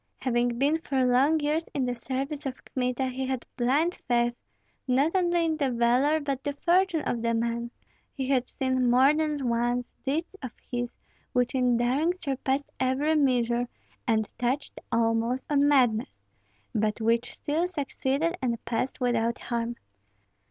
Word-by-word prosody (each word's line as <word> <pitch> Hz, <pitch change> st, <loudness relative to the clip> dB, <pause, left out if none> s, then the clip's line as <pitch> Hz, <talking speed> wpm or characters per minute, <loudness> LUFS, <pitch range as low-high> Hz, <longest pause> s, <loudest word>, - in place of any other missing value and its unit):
Having 240 Hz, -1 st, +1 dB
been 290 Hz, +5 st, +2 dB
for 270 Hz, -5 st, 0 dB
long 270 Hz, +6 st, +4 dB
years 305 Hz, +3 st, 0 dB
in 270 Hz, -3 st, +1 dB
the 245 Hz, -, -1 dB
service 270 Hz, +4 st, -3 dB
of 260 Hz, -, -7 dB
Kmita, 250 Hz, 0 st, -1 dB
he 260 Hz, +1 st, -3 dB
had 260 Hz, -2 st, -3 dB
blind 280 Hz, +8 st, +2 dB
faith, 240 Hz, -1 st, +2 dB, 0.5 s
not 270 Hz, +5 st, +3 dB
only 345 Hz, -2 st, +2 dB
in 320 Hz, -1 st, 0 dB
the 280 Hz, -3 st, +1 dB
valor, 250 Hz, +6 st, +3 dB
but 275 Hz, -3 st, -3 dB
the 285 Hz, -, -2 dB
fortune 345 Hz, +1 st, +2 dB
of 235 Hz, -, -1 dB
the 230 Hz, 0 st, +1 dB
man; 235 Hz, +1 st, -1 dB, 0.4 s
he 265 Hz, -2 st, -4 dB
had 260 Hz, -2 st, +1 dB
seen 260 Hz, -2 st, 0 dB
more 260 Hz, +4 st, +6 dB
than 305 Hz, -1 st, 0 dB
once 240 Hz, +1 st, 0 dB
deeds 320 Hz, +7 st, -2 dB
of 255 Hz, -3 st, -6 dB, 0.2 s
his 245 Hz, -1 st, -3 dB, 0.4 s
which 250 Hz, +1 st, +1 dB
in 250 Hz, -2 st, +2 dB
daring 270 Hz, +8 st, +2 dB
surpassed 275 Hz, -4 st, -2 dB
every 265 Hz, +4 st, +1 dB
measure, 245 Hz, -5 st, +2 dB, 0.4 s
and 220 Hz, -2 st, +2 dB
touched 250 Hz, +4 st, -1 dB
almost 230 Hz, +2 st, +1 dB
on 285 Hz, 0 st, +4 dB
madness, 250 Hz, -4 st, +2 dB, 0.6 s
but 215 Hz, -1 st, 0 dB
which 230 Hz, +2 st, +1 dB
still 320 Hz, +4 st, -1 dB
succeeded 295 Hz, 0 st, -1 dB
and 235 Hz, -3 st, -2 dB
passed 240 Hz, +3 st, -2 dB
without 235 Hz, -1 st, +1 dB
harm. 235 Hz, 0 st, -3 dB
255 Hz, 155 wpm, -27 LUFS, 240-290 Hz, 0.6 s, more